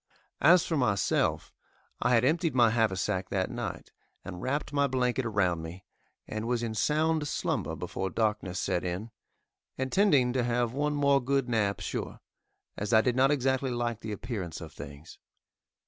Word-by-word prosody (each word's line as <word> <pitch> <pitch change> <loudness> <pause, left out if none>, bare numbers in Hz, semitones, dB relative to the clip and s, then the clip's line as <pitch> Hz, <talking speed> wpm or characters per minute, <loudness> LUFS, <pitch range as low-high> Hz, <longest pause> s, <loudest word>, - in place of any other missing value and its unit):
As 170 +3 +6
for 165 - -1
myself, 110 -8 +1 0.5
I 125 0 +3
had 115 +1 +3
emptied 160 0 +1
my 120 -3 +5
haversack 95 -4 0
that 95 -2 -1
night, - - -5 0.3
and 90 -2 -7
wrapped 140 +4 -2
my 140 -1 +3
blanket 125 -1 0
around 90 -6 +1
me, 85 +3 -9 0.4
and 110 +1 -4
was 120 -1 0
in 115 -1 -2
sound 155 +6 +1
slumber - - -2
before 95 0 -4
darkness 105 -3 -1
set 90 - -1
in, 90 +6 -4 0.7
intending 130 -3 +3
to 130 -1 +1
have 120 0 0
one 150 +2 0
more 140 -1 +3
good 135 0 +1
nap 105 -4 0
sure, - - -4 0.6
as 105 +3 -3
I 110 - +7
did 125 +1 0
not 135 +1 +4
exactly 130 -2 +1
like 120 -2 -2
the 110 - -6
appearance 105 -6 -5
of 80 - -9
things. 70 +3 -11
120 Hz, 165 wpm, -29 LUFS, 100-135 Hz, 0.7 s, I